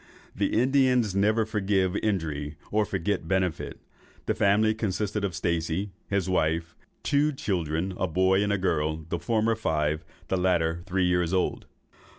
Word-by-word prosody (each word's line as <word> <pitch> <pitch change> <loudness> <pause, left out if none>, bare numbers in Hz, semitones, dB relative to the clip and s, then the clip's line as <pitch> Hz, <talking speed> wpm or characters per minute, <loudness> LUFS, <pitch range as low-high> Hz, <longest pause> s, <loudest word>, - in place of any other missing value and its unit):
The - - +1
Indians 125 -4 +3
never 110 +3 +2
forgive 100 -3 0
injuries 75 -8 -2 0.2
or 105 0 +2
forget 95 -2 -2
benefits. 95 -2 -1 0.5
The - - +1
family 105 +2 +3
consisted 105 -1 -2
of 95 -4 -2
Stacey, 85 +2 -1 0.2
his 100 -2 0
wife, 85 -2 0
and - - -37
two 145 +2 +2
children, 95 - -2
a 95 - +1
boy 95 +3 +3
and 100 -1 0
girl, 80 -3 0
the 85 - -2
former 110 +6 +1
five, 80 -6 -1 0.2
the 95 - 0
latter 85 -2 +1
three 95 0 +1
years 90 -1 +1
old." 95 - 0
95 Hz, 150 wpm, -27 LUFS, 85-105 Hz, 0.5 s, Indians